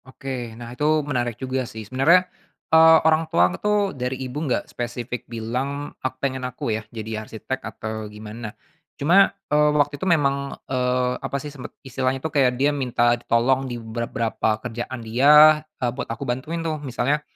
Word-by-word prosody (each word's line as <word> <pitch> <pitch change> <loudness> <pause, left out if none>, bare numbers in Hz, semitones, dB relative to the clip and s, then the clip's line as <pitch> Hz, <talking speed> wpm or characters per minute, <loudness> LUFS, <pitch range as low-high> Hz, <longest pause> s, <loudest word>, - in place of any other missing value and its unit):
Oke, 125 -3 -6
nah 120 0 -8
itu 150 +2 +1
menarik 120 -5 -2
juga 130 0 -2
sih. 110 -1 -8
Sebenarnya, 145 - +4 0.5
eee, 160 0 +8
orang 160 0 +3
tuang 90 +1 +3
tuh 210 -1 +1
dari 130 0 -3
Ibu 130 +3 -6
enggak - - +1
spesifik 120 0 -5
bilang 125 +5 -4
ak 130 0 -3
pengen 130 -1 -2
aku 125 -2 -3
yah, 110 - -2
jadi 110 -1 -5
arsitek, 115 +5 -6
atau 110 -1 -6
gimana 105 +2 -8 0.5
cuma, 175 +7 +5 0.2
eee, 150 0 +5
waktu 145 -1 +1
itu - - -2
memang, 140 -4 +1
eee, 125 -1 0
apa 140 - -3
sih 145 +1 -7
sempet 130 -4 -9
istilahnya 130 0 -1
itu, 160 +4 -5
kayak 135 -4 +3
dia 145 +3 +2
minta 125 -3 +2
ditolong 125 +3 +1
di 120 - -4
beberapa 115 -1 -2
kerjaan 120 0 -5
dia, 150 +6 +7 0.2
eee, 120 -1 -1
buat 135 - -5
aku 115 -1 -4
bantuin 155 +7 -3
tuh. 155 -2 -2
Misalnya, 140 +2 0
130 Hz, 170 wpm, -23 LUFS, 120-145 Hz, 0.5 s, eee